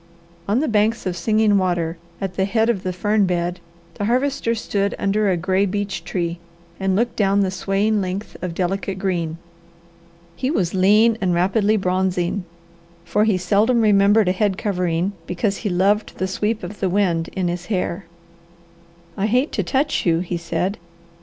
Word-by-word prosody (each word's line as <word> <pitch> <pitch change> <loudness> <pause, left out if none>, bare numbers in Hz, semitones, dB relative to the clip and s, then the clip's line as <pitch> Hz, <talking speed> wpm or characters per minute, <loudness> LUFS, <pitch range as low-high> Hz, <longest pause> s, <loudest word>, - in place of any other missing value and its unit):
On 215 +6 +2
the 310 - 0
banks 220 0 +1
of 185 -2 -1
Singing 215 +2 +2
Water, 175 -3 0 0.2
at 195 -2 -3
the 190 +1 0
head 225 +3 +2
of 200 -5 -4
the 185 - -2
fern 205 +2 +1
bed, 175 0 -1 0.3
the 205 - -3
Harvester 250 0 +1
stood 200 -2 -1
under 200 +1 +1
a 180 - +1
gray 190 +3 +1
beech 205 +1 -3
tree 170 -2 -3 0.4
and 190 -1 +1
looked 235 +3 0
down 200 -1 +2
the 190 -1 +1
swaying 200 +3 0
length 190 +3 -4
of 180 -2 -4
delicate 190 +1 -2
green. 170 -4 -2 1.0
He 255 - -2
was 185 - 0
lean 210 +4 +4
and 180 -2 +1
rapidly 200 +4 +2
bronzing, 185 0 0 0.6
for 210 - +2
he 210 -4 +2
seldom 210 +6 +2
remembered 205 0 +4
a - - +4
head 195 0 0
covering 180 -3 -1 0.2
because 195 +3 -1
he 210 - -3
loved 195 +4 +1
the 190 - -1
sweep 210 +3 -2
of 190 +4 -7
the 190 - 0
wind 175 -4 +1
in 185 -2 -1
his 175 0 -4
hair. 185 -3 -2 1.1
"I 195 - 0
hate 250 +6 +1
to - - -1
touch 290 +2 0
you," 165 -1 +2
he 180 -1 -3
said. 170 +3 -2
195 Hz, 170 wpm, -21 LUFS, 180-210 Hz, 1.1 s, lean